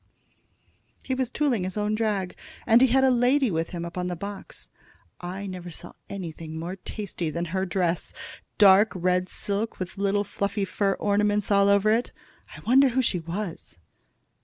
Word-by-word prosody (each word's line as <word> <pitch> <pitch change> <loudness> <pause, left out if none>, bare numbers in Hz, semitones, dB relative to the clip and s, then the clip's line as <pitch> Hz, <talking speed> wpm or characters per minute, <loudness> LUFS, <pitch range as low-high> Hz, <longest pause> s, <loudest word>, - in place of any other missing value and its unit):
"He 260 - -2
was 260 -2 -1
tooling 250 -7 0
his 185 +2 -4
own 210 0 0
drag, 210 -4 -1 0.3
and 230 +1 +5
he 265 - +7
had 265 +2 +3
a 265 - +5
lady 250 0 +3
with 165 0 -1
him 170 -2 -5
on 180 0 -3
the 180 - -3
box. 200 +3 -8 0.5
I 185 +3 -6
never 180 -2 -7
saw 175 +1 -11 0.2
anything 165 -4 -6
more 170 +3 -4
tasty 190 -4 -5
than 170 +3 -3
her 190 0 0
dress, 180 -2 -1 0.5
dark 205 +1 +6
red 180 0 +1
silk, 205 +2 -3
with 185 +1 -6
little 200 0 +1
fluffy 200 0 -2
fur 195 +1 0
ornaments 205 +1 +1
all 200 0 +5
over 200 +1 +4
it. 230 +3 0 0.4
I - - -11
wonder 265 +3 +5
who 255 +1 +1
she 185 -6 0
was?" 170 - -5
200 Hz, 170 wpm, -26 LUFS, 180-215 Hz, 0.5 s, he